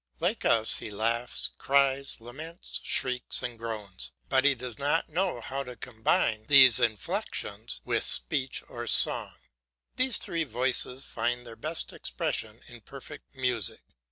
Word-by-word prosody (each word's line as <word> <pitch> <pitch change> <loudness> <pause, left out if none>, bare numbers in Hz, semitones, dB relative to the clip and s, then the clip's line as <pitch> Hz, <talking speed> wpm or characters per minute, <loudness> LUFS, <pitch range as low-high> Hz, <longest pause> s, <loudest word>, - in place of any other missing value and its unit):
Like - - -1
us, 110 -1 +3
he - - -7
laughs, 115 +4 +1
cries, 140 -1 +1
laments, 150 +9 -8
shrieks, 125 -1 -1
and 120 -1 -4
groans, 110 -4 -4 0.2
but 130 +1 +3
he 140 -1 +5
does 125 0 -6
not 145 +4 0
know 175 -5 -1
how 135 +4 -4
to 125 -2 -9
combine 110 -2 -1
these 130 -5 +9
inflexions 110 -3 -2
with - - 0
speech 135 -1 +2
or - - -7
song. - - +2 0.6
These 255 -2 +4
three 165 -1 -2
voices 130 0 0
find 120 0 -3
their 115 -1 -10
best 155 +8 -4
expression - - -4
in - - -13
perfect - - -12
music. 125 -5 0
125 Hz, 140 wpm, -28 LUFS, 115-140 Hz, 0.6 s, these